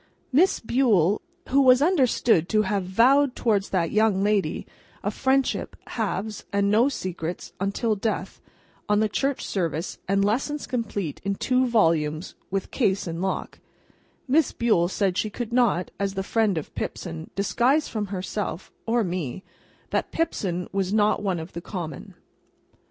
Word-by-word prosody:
Miss 330 +9 +4
Bule—who 255 - +1
was 255 -1 +6
understood 255 - +3
to 215 -1 +3
have 200 -2 -1
vowed 255 +8 +4
towards 205 -4 +1
that 170 -4 0
young 215 -3 +3
lady, 200 -6 0 0.4
a 205 - 0
friendship, 265 +3 0
halves, 215 -1 -3
and 200 0 +2
no 230 +6 +4
secrets, 180 - -5
until 200 +3 0
death, 215 +2 -3 0.5
on 210 0 +4
the 215 - +3
Church 275 +6 -1
Service 165 -3 -2
and 195 +1 +2
Lessons 275 +8 -1
complete 205 - -3
in 200 0 -1
two 255 +4 +1
volumes 165 -7 +1 0.2
with 195 0 -3
case 200 -7 +1
and 165 0 -4
lock—Miss 260 +8 -3
Bule 215 -8 +2
said 190 -2 0
she 215 - 0
could 235 +2 -5
not, 235 -8 +2
as 200 0 -1
the 195 - -1
friend 215 -3 +1
of 155 - -5
Pipson, 80 -1 -5
disguise 250 +9 +2
from 210 -2 -3
herself, 190 -1 -4 0.2
or 235 0 +2
me, 175 -3 -3 0.5
that - - -1
Pipson 190 - -1
was 195 -1 -1
not 210 0 +3
one 190 -4 -1
of 160 +2 -8
the 170 - -5
common. 170 -6 -6
205 Hz, 145 wpm, -25 LUFS, 185-240 Hz, 0.5 s, was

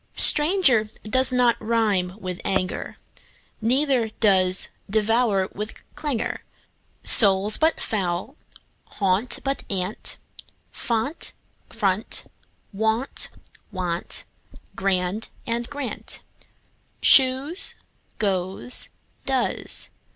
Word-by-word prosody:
Stranger 295 - +4
does 260 +4 +1
not 245 -2 +3
rime 210 -5 0
with 185 -4 -6
anger, 190 -1 -2 0.6
Neither 255 0 +1
does 190 -4 +3 0.2
devour 215 -2 +1
with 210 +2 -7
clangour. 280 -7 -3 0.6
Soul, 200 -1 +6
but 320 +1 +2
foul 180 -3 -2 0.6
and - - -19
gaunt, 200 +4 +1
but 275 0 -2
aunt; 190 +1 -2 0.5
Font, 240 +7 -2 0.4
front, 205 -1 -2 0.5
wont; 220 +5 -1 0.4
want, 180 -3 -4 0.5
grand, 190 +2 -1 0.2
and, 235 0 -3
grant, 285 -4 -6 0.8
Shoes, 270 +7 +5 0.4
goes, 190 +3 +4 0.4
does. 265 -2 -1
220 Hz, 85 wpm, -23 LUFS, 190-255 Hz, 0.8 s, Soul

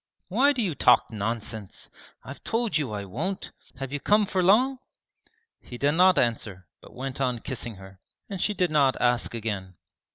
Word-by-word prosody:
'Why 260 +10 +4
do 255 -5 -1
you 180 -6 -1
talk 125 -4 +4
nonsense? 110 -1 -4 0.3
I've 140 - -10
told 230 -3 -1
you 145 -7 0
I 100 -1 -4
won't! 165 - -4 0.3
Have 135 +1 -6
you 145 - -2
come 210 +7 +3
for 190 -1 0
long?' 250 +9 +4 0.8
He 120 - -10
did 140 +3 +2
not 180 +3 +5
answer 105 -6 -1 0.2
but - - -16
went 135 +1 -5
on 125 -2 +1
kissing 120 -2 -4
her, 95 0 -14 0.3
and 195 -3 -5
she 210 - 0
did 180 -4 +1
not 140 -3 +3
ask 120 -1 +1
again. 100 -5 -4
135 Hz, 175 wpm, -26 LUFS, 115-185 Hz, 0.8 s, not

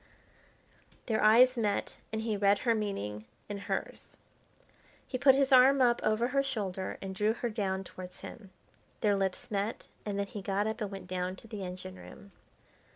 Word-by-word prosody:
Their 220 -2 0
eyes 245 +4 +7
met, 205 -3 -1
and 220 0 -2
he 220 -2 0
read 200 0 +4
her 235 - +4
meaning 110 - -3 0.2
in 205 -1 -5
hers. - - -4 0.9
He 255 - -4
put 270 0 +7
his 275 0 +2
arm 265 +2 +7
up 240 -2 +4
over 220 +3 +2
her 275 +1 +2
shoulder 200 -8 -3
and 190 0 -4
drew 210 +3 +1
her 240 0 -3
down 195 -3 -1
towards 180 -1 -10
him. 205 -5 -10 0.5
Their 205 -2 +3
lips 195 0 -2
met, 205 +2 -2 0.2
and 205 -2 -3
then 200 - 0
he 200 +1 -7
got 200 +1 0
up 220 +1 -3
and 210 - -1
went 195 -2 -8
down 180 0 -3
to 225 - -14
the 210 -3 -6
engine 185 +1 -7
room. 200 +2 -13
205 Hz, 180 wpm, -31 LUFS, 190-230 Hz, 0.9 s, eyes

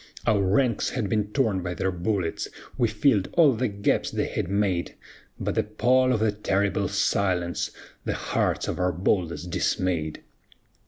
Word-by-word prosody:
Our 105 -2 +3
ranks 105 +4 +2
had 115 -6 -2
been 105 -2 +1
torn 105 -4 0
by 90 0 -4
their 95 +3 0
bullets, 90 -1 -2 0.3
We 120 - +2
filled 110 -3 +2
all 155 -6 +6
the 125 +3 0
gaps 100 -1 0
they - - -1
had - - -3
made; 100 -3 0 0.4
But - - -1
the - - +2
pall 130 +2 +2
of 115 -4 +1
that 105 -1 -1
terrible 100 +1 +1
silence 90 -3 0 0.3
The - - -2
hearts - - -1
of - - -3
our 90 0 +2
boldest 90 -1 -1
dismayed. 85 -4 -1
100 Hz, 160 wpm, -26 LUFS, 90-110 Hz, 0.4 s, all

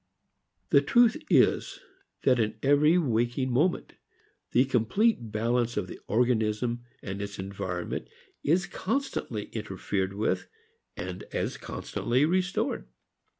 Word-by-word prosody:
The 140 - +7
truth 235 - +4
is - - +3 0.4
that 125 -2 +4
in 110 -1 0
every 145 +4 +5
waking 125 -3 +1
moment, 155 +9 +1 0.6
the 125 +2 +4
complete 125 - +1
balance 120 +2 0
of 105 - 0
the 90 - -9
organism 120 +1 +1 0.2
and 100 0 -4
its 100 0 -5
environment 95 -2 -4 0.4
is 175 +5 +2
constantly 185 - -3
interfered 95 -2 -2
with 95 -2 -1 0.5
and 90 +1 -5
as - - -2
constantly 125 +5 -1
restored. 185 +3 0
120 Hz, 110 wpm, -28 LUFS, 105-145 Hz, 0.6 s, The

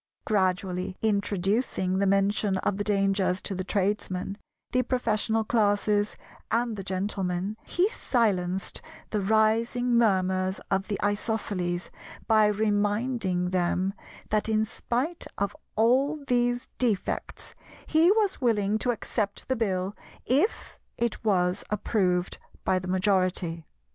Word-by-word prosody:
Gradually 185 -3 0
introduction 200 -1 0
the 200 - +2
mention 195 0 +2
of 190 +1 -1
the 205 - -1
dangers 195 -2 +1
to - - -2
the 185 0 -3
Tradesmen, 195 0 -1 0.3
the 255 - +3
Professional 225 -3 0
Classes 205 -1 +1 0.3
and 235 -1 0
the 195 - -6
Gentlemen, 190 0 -2
he 360 +2 +2
silenced 195 - 0 0.3
the 210 - 0
rising 220 +4 +2
murmurs 190 -4 +2
of 195 0 +1
the 205 - -2
Isosceles 205 -4 -1 0.3
by 215 -2 +5
reminding 205 -2 0
them 185 +1 +1 0.4
that, 215 +1 +1
in 220 0 +2
spite 255 +9 -3
of 200 0 -1 0.2
all 270 +7 +2
these 245 -1 +1
defects, 225 -6 -1 0.3
he 320 +3 +4
was 420 -5 +1
willing 215 -3 +2
to 250 - -1
accept 215 -3 -2
the 260 - +1
Bill 195 -3 -1 0.3
if 290 - +1 0.2
it 235 -1 -1
was 185 -3 +1
approved 190 -4 0 0.2
by 185 - +2
the 185 - -7
majority. 185 -3 0
205 Hz, 120 wpm, -27 LUFS, 190-225 Hz, 0.4 s, by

